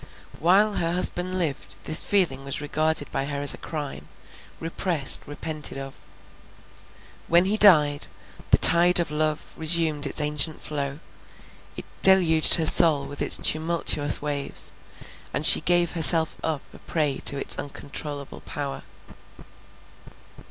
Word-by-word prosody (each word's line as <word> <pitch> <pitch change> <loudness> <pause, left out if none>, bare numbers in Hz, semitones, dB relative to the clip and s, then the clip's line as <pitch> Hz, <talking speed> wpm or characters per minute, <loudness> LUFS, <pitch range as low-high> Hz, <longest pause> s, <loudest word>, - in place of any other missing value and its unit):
While 200 +6 +1
her 165 0 -3
husband 180 0 -3
lived, 135 - -5
this 155 - +5
feeling 175 -10 -2
was 140 0 -4
regarded 155 0 -4
by 135 - -4
her 140 0 -6
as 145 - +6
a - - -11
crime, 145 - -8 0.5
repressed, 165 -3 -1
repented 150 0 -4
of. 135 0 -9 1.3
When 170 +2 +2
he 200 +3 -1
died, 150 -9 +3 0.4
the - - +4
tide 175 +1 +5
of 170 -3 -4
love 155 0 -4
resumed 160 -2 0
its - - -4
ancient 150 +1 -3
flow, 140 -2 -5 0.8
it - - -8 0.2
deluged 175 -5 +6
her 165 - -2
soul 155 -3 +5
with 145 - -10
its - - +1
tumultuous 155 -3 +1
waves, 145 -1 -2 0.6
and - - -1
she - - +5
gave 175 -1 0
herself 165 -1 +3
up 155 -3 -4
a - - -15
prey 150 -4 -3
to 140 - +2
its - - 0
uncontrollable 145 0 -8
power. 140 -1 -7
155 Hz, 135 wpm, -22 LUFS, 145-170 Hz, 1.3 s, as